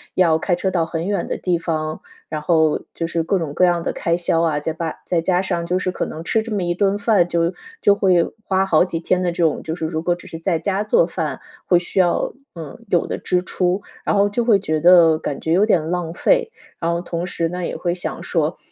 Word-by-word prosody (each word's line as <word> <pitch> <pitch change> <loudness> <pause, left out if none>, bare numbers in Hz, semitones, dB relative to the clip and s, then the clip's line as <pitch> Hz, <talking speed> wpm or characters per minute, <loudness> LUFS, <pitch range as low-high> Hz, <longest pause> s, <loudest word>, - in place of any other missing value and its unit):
要 165 -4 +4
开 175 0 +1
车 190 +1 -1
到 170 -3 +1
很 165 +1 -4
远 200 -3 -1
的 - - -3
地 180 -2 0
方， 155 -2 -3 0.3
然 155 -1 -3
后 160 -1 +2
就 165 - -3
是 165 0 -1
各 190 +4 +1
种 155 -4 -4
各 180 - +4
样 175 -1 +1
的 - - -1
开 170 0 -1
销 170 -1 +1
啊， 155 -3 +1
再 160 - -2
把 160 0 -4
再 175 - +1
加 180 +1 +1
上 175 -3 -2
就 180 +2 0
是 185 - -1
可 - - -3
能 160 +1 -7
吃 220 +5 +1
这 220 -1 -4
么 190 - -1
一 175 0 0
顿 200 +2 +1
饭 205 -4 +3
就 170 +1 0 0.3
就 205 - +5
会 180 -4 +3 0.2
花 190 0 +1
好 175 -2 +4
几 165 -3 -4
天 180 +2 +1
的 175 -1 0
这 175 -1 -1
种 160 - +1
就 160 - -4
是 165 - -4
如 160 0 -2
果 175 +1 +1
只 175 - -14
是 165 - -8
在 165 -1 0
家 195 +4 -1
做 190 -5 +4
饭， 160 -6 -4 0.2
会 175 - +4
需 175 +2 -2
要 175 -2 +2 0.2
嗯， 160 +1 -8
有 175 - +2
的 - - -3
支 180 0 0
出。 185 +1 -1 0.2
然 - - +1
后 200 0 +3
就 230 +3 -1
会 210 -5 +5
觉 155 -5 -1
得 170 -1 +6
感 140 -3 -4
觉 160 - -2
有 190 +5 +4
点 165 -7 +1
浪 175 -2 -2
费， 475 - +2 0.3
然 165 - -1
后 170 0 -1
同 175 0 -4
时 165 -2 -2
呢， 180 0 -4
也 - - -4
会 175 -1 -1
想 175 - -4
说： 160 0 -1
175 Hz, 270 characters per minute, -20 LUFS, 165-185 Hz, 0.3 s, 得